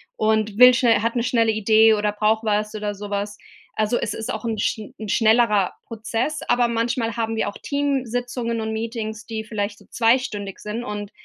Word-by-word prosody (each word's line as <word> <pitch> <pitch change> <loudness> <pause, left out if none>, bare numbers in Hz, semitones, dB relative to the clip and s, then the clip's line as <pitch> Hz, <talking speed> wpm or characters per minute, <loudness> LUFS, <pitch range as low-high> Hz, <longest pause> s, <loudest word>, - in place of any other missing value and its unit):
und 215 -1 0
will 250 0 +9
schnell 235 -4 +3
hat 230 +2 -1
'ne 235 - +1
schnelle 230 -3 +2
Idee 220 +1 +5
oder 210 0 0
braucht 215 +1 +1
was 210 0 0
oder 210 -1 -3
sowas. 205 0 -4 0.4
Also 215 +3 +2
es - - -2
ist 220 - -4
auch 220 - -5
'n 225 -2 -2
schn 215 +1 -2
'n 215 - -6
schnellerer 220 -3 +3
Prozess, 230 +5 -3
aber 245 0 +3
manchmal 230 0 -1
haben 225 -1 -2
wir 220 - 0
auch 205 - -5
Teamsitzungen 245 -4 -2
und 220 0 -3
Meetings, 225 -1 -4
die 220 -1 -4
vielleicht 205 -1 -4
so - - -19
zweistündig 225 -5 +1
sind 215 +3 -5
und 205 -2 -5
220 Hz, 185 wpm, -22 LUFS, 210-235 Hz, 0.4 s, will